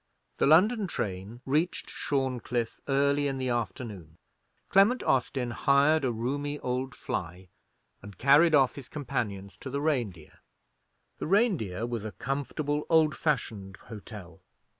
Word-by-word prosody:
The - - +2
London 200 +7 +5
train 100 - -5
reached 155 +6 0
Shorncliffe 125 -4 -2
early 140 +1 +2
in 135 -1 -2
the 130 -1 -2
afternoon. 105 - -4 0.5
Clement 200 +7 +4
Austin 125 -1 0
hired 140 +5 +3
a 130 - +1
roomy 140 +6 -2
old 125 +1 -2
fly, 90 +1 -5 0.5
and 105 -3 -11
carried 150 +6 +5
off 135 -3 +4
his 140 -2 -10
companions 110 -9 -4
to 135 - -7
the 140 +2 -2
Reindeer. 120 - -2 0.8
The - - -3
Reindeer 160 - +1
was 120 -3 -4
a 110 - -6
comfortable 145 +3 -3
old 160 -2 +4
fashioned 110 -10 -2
hotel. 105 -4 -11
130 Hz, 130 wpm, -28 LUFS, 110-145 Hz, 0.8 s, London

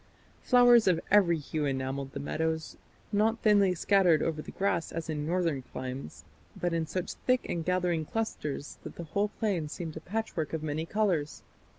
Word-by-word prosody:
Flowers 245 -3 +6
of 175 -3 +4
every 185 -5 +5
hue 150 0 -3
enamelled 135 0 -2
the - - -4
meadows; 160 +2 -2 0.4
not 220 +2 +2
thinly 200 -4 +5
scattered 180 -3 +4
over 155 -2 -1
the - - -10
grass 180 -4 -1
as 165 -1 -4
in 150 -1 -3
northern 170 -5 0
climes, 130 - -7 0.4
but 175 -1 0
in 165 -1 0
such 185 +3 -3
thick 255 0 +2
and 170 - -2
gathering 180 -3 +1
clusters 150 -7 -4
that - - -8
the 170 - -6
whole 200 +6 0
plain 185 -9 -1
seemed 160 0 -6
a - - -5
patchwork 180 -6 -3
of 160 -1 -2
many 155 +2 -2
colours. 185 -9 0
165 Hz, 175 wpm, -30 LUFS, 155-200 Hz, 0.4 s, Flowers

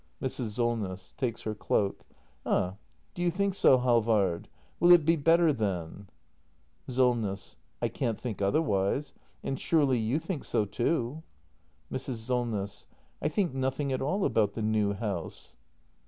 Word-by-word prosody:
Mrs. 125 -5 -2
Solness. 105 -7 -2
[Takes 120 -4 -2
her 110 - -2
cloak.] 100 -1 -1 0.4
Ah, 95 +2 0 0.4
do 175 - -6
you 175 - +3
think 200 +3 0
so, 135 -8 +5
Halvard? 110 -8 +2 0.3
Will 175 +1 +6
it 170 -4 +7
be 165 +1 +4
better 165 +1 +4
then? 100 -4 -3 0.8
Solness. 120 -6 0 0.3
I - - +3
can't 115 -5 -2
think 115 -5 -5
otherwise. 100 +3 +1 0.3
And 135 - -3
surely 140 -7 +2
you 115 +6 0
think 165 -1 -4
so 105 - 0
too? 120 +6 -1 0.7
Mrs. 130 -1 -3
Solness. 110 -4 -3 0.3
I - - +1
think 170 0 0
nothing 135 +1 -1
at 130 - -2
all 190 +9 0
about 105 -3 +2
the 110 - -3
new 105 -2 +1
house. 100 -5 -5
120 Hz, 140 wpm, -29 LUFS, 105-145 Hz, 0.8 s, it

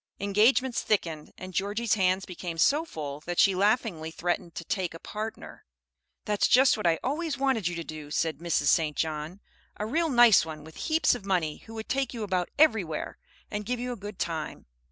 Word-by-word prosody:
Engagements 225 +6 +3
thickened, 165 -7 -1
and 185 0 -8
Georgie's 205 +5 0
hands 190 -2 +2
became 175 -2 -6
so 290 - +3
full 145 - -6
that 175 -1 -3
she 195 - +6
laughingly 195 -4 +1
threatened 175 +1 -3
to - - -5
"take 180 -2 -2
a - - -9
partner." 215 +4 -7 0.6
"That's 210 -1 +2
just 260 +1 +6
what 210 -5 -1
I 165 -1 +3
always 305 +4 -2
wanted 265 -8 +1
you 175 - -2
to 170 - -4
do," 155 -2 -8
said 160 +1 -1
Mrs. 170 -3 0
St. 155 -3 +2
John, 160 +4 -3 0.4
"a 210 - -3
real 320 +8 0
nice 240 -5 +7
one, 155 -2 -7
with 160 +1 -13
heaps 320 +1 +4
of 245 - -5
money, 180 -6 0
who 225 - -9
would 220 0 -6
take 270 -1 -1
you 225 - -4
about 185 -3 -1
everywhere, 220 - +2 0.3
and 210 0 -3
give 245 +3 -2
you 250 +1 -3
a - - -3
good 205 -2 -8
time." 160 -2 -4
195 Hz, 195 wpm, -28 LUFS, 165-230 Hz, 0.6 s, nice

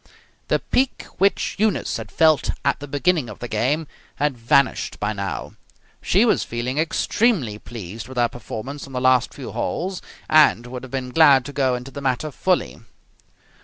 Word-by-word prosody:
The - - +2
pique 260 0 0 0.2
which 195 0 +2
Eunice 215 0 +1
had - - -8
felt 155 -3 +3 0.2
at 140 - +2
the 145 - -7
beginning 145 -1 +1
of 105 - -9
the 120 - -6
game 130 +9 0 0.3
had 145 -1 0
vanished 120 +3 +1
by 105 +1 -1
now. 100 -1 -4 0.5
She - - +3
was - - +2
feeling 120 +4 -3
extremely 160 - +1
pleased 110 0 -8
with 130 -1 -10
her 120 -1 +4
performance 125 +4 -7
on 135 - -12
the 125 - -1
last 130 -1 +3
few - - -8
holes, 185 +1 -3 0.3
and 150 -6 +5
would 125 0 -7
have 130 - -10
been 130 -2 -3
glad 140 -4 +6
to 145 - -7
go 130 -3 +1
into 125 +2 -7
the 140 - -7
matter 135 +3 -1
fully. 185 +6 0
135 Hz, 175 wpm, -22 LUFS, 120-155 Hz, 0.5 s, glad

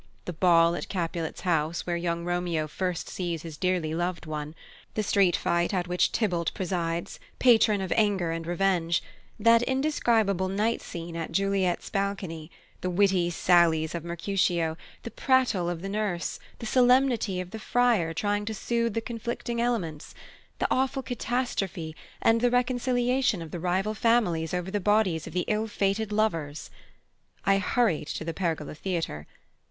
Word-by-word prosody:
The 180 - -4
ball 170 0 +4
at 175 - -5
Capulet's 170 -3 -3
house, 165 -2 0
where 175 - -1
young 170 0 -2
Romeo 175 -3 -1
first 180 +2 -3
sees 170 -4 -3
his 165 -2 -7
dearly 180 -2 0
loved 175 +1 -2
one; 155 0 -5 0.4
the 215 - 0
street 195 -3 +3
fight 170 +3 0
at 180 -1 -1
which 180 0 +2
Tybalt 180 -7 0
presides, 170 -2 -2 0.2
patron 220 -5 +5
of 190 - -1
anger 200 -6 +2
and 165 0 -4
revenge; 175 -2 +1 0.4
that 230 0 +5
indescribable 235 - +1
night 210 +4 0
scene 170 0 -7
at 165 -1 -4
Juliet's 195 0 0
balcony; 195 -6 -3 0.3
the 180 - -1
witty 185 -1 +2
sallies 170 -2 +3
of 170 -2 -4
Mercutio; 170 -1 0 0.3
the 235 - -6
prattle 250 -10 +2
of 175 0 -4
the - - -3
Nurse; 200 -4 -2 0.2
the - - -7
solemnity 245 -5 +3
of 180 0 -6
the 220 - -6
Friar 230 -8 +2
trying 205 +5 -1
to 220 +1 -3
soothe 230 +1 -1
the 225 - 0
conflicting 235 0 -4
elements; 185 -11 -2 0.4
the - - 0
awful 265 +1 +1
catastrophe; 215 -10 -2 0.3
and 225 0 +4
the 245 - +4
reconciliation 245 -2 +1
of 165 -2 -8
the 175 - -4
rival 185 +5 0
families 215 -8 +2
over 180 +1 -3
the 205 - 0
bodies 195 -5 +2
of - - -8
the 180 0 0
ill 215 +1 0
fated 205 +1 -1
lovers. 165 -9 -1 0.7
I 195 0 +4
hurried 200 - +1
to 160 - -4
the 165 - -3
Pergola 160 -5 -2
Theatre. 165 - -3
185 Hz, 160 wpm, -27 LUFS, 170-220 Hz, 0.7 s, patron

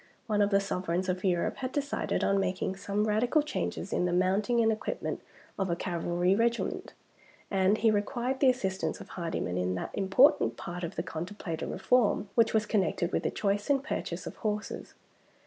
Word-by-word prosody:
One 210 -3 +1
of 205 - +3
the 200 -1 +4
sovereigns 185 -2 -2
of 185 0 -1
Europe 180 -3 +1
had 255 -1 -3
decided 285 0 -1
on 195 0 +3
making 190 0 -1
some 200 +2 -1
radical 240 +8 +2
changes 300 - -3
in - - +1
the 180 - 0
mounting 195 +6 +2
and 225 -1 +4
equipment 215 - -3 0.4
of 190 -1 0
a 170 - +1
cavalry 175 +1 0
regiment; 230 +3 0 0.6
and 195 +2 +3
he 225 -1 +4
required 240 +5 -1
the 270 - +6
assistance 195 -7 -1
of - - -11
Hardyman 165 - -3
in 90 0 0
that 90 - -4
important 190 - +4
part 175 +1 -6
of 170 +2 -4
the 165 - -2
contemplated 165 0 -5
reform 225 -4 +2
which 230 -2 +4
was 215 -1 +2
connected 185 -4 0
with - - 0
the - - 0
choice 205 +2 -1
and 275 -1 +3
purchase 305 - -4
of - - -7
horses. 210 -1 -4
200 Hz, 180 wpm, -30 LUFS, 180-225 Hz, 0.6 s, the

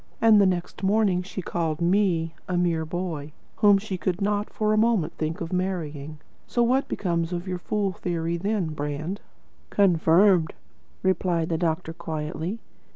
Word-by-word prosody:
And 220 -2 +6
the 195 - +5
next 180 -1 -2
morning 195 -2 +2
she 190 0 -6
called 160 -3 -2
ME 170 -2 +2 0.2
'a 180 - 0
mere 170 -2 +1
boy,' 160 -3 -4 0.2
whom 205 -1 +6
she 195 -2 -4
could 180 0 -1
not 205 +1 0
for 215 0 +1
a - - +3
moment 215 -7 +2
think 160 +2 -3
of 165 +1 -4
marrying. 155 -5 -3 0.3
So 240 - +1
what 260 +3 +2
becomes 170 -3 -1
of 175 +1 -4
your 180 -1 -3
fool 200 +1 -1
theory, 170 -1 -2
Brand?" 165 -3 -2 0.5
"Confirmed," 175 -2 +4 0.5
replied 180 -3 +1
the 165 - 0
doctor 160 -1 -1
quietly. 160 +3 -4
180 Hz, 155 wpm, -25 LUFS, 165-200 Hz, 0.5 s, And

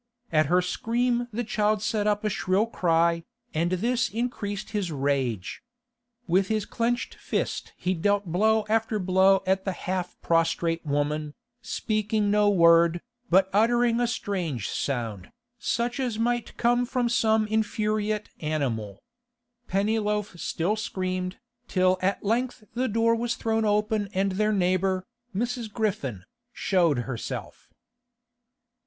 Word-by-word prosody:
At 155 -2 +3
her 180 +3 +3
scream 240 +5 0
the 235 +3 -2
child 215 -1 0
set 215 -1 0
up 210 0 +1
a 215 - +1
shrill 190 +3 +1
cry, 170 -5 +1 0.3
and 170 +3 0
this 235 +6 +1
increased 215 -3 -3
his 200 -6 -2
rage. 135 - -1 0.6
With 185 +2 +2
his 215 -2 0
clenched 240 +1 -1
fist - - -3
he 185 - 0
dealt 205 +4 +1
blow 215 +5 +2
after 225 0 +1
blow 190 0 +4
at 190 0 +1
the 190 - -2
half 180 0 -4
prostrate 165 0 +1
woman, 150 0 -1 0.3
speaking 215 -2 0
no 210 0 +4
word, 170 -2 +5 0.3
but 190 +2 +5
uttering 235 +2 +3
a 240 - +2
strange 175 - -2
sound, 115 -8 -3 0.3
such 240 +2 -1
as 245 -5 -1
might 240 +1 -1
come 245 +1 +2
from 250 -1 0
some 220 -2 +2
infuriate 215 0 -1
animal. 120 -10 -2 0.6
Pennyloaf 210 0 0
still 175 +7 -1
screamed, 185 -3 -3 0.3
till 185 -1 +2
at 195 +2 0
length 235 +2 -1
the 255 +3 0
door 230 +1 +2
was 235 +1 -1
thrown 225 -1 0
open 210 0 +1
and 195 +1 +1
their 215 +3 +1
neighbour, 185 -1 +1 0.3
Mrs. 235 +1 -2
Griffin, 145 - -2 0.3
showed 175 - +2
herself. 120 -2 -6
205 Hz, 130 wpm, -26 LUFS, 175-220 Hz, 0.6 s, word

